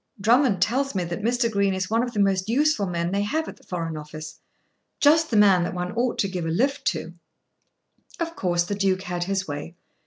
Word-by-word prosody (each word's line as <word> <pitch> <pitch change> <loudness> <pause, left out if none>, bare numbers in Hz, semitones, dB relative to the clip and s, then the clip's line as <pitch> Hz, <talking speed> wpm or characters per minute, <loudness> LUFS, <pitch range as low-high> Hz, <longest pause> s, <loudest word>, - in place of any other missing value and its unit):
"Drummond 230 0 +3
tells 270 +2 -1
me 185 - 0
that 170 +3 -4
Mr. 240 +2 +1
Green 200 -2 +1
is 190 +2 -3
one 225 +1 +3
of 245 0 -2
the 210 - -2
most 195 0 +1
useful 265 -4 +2
men 170 -1 -2
they 200 +1 0
have 315 +10 -1
at - - -8
the - - -23
Foreign 165 -3 -4
Office; 155 +1 -8 0.6
just 315 +2 +4
the 225 - +1
man 195 -3 +6
that 175 - -3
one 180 0 -3
ought 240 +1 -1
to 195 - +1
give 180 -3 -4
a - - -1
lift 270 +11 0
to." 170 -3 -2 1.1
Of 335 0 -3
course 175 - +1
the 180 - -4
Duke 195 -2 0
had 175 -2 -3
his 195 0 -2
way. 145 +3 -6
195 Hz, 220 wpm, -24 LUFS, 175-240 Hz, 1.1 s, man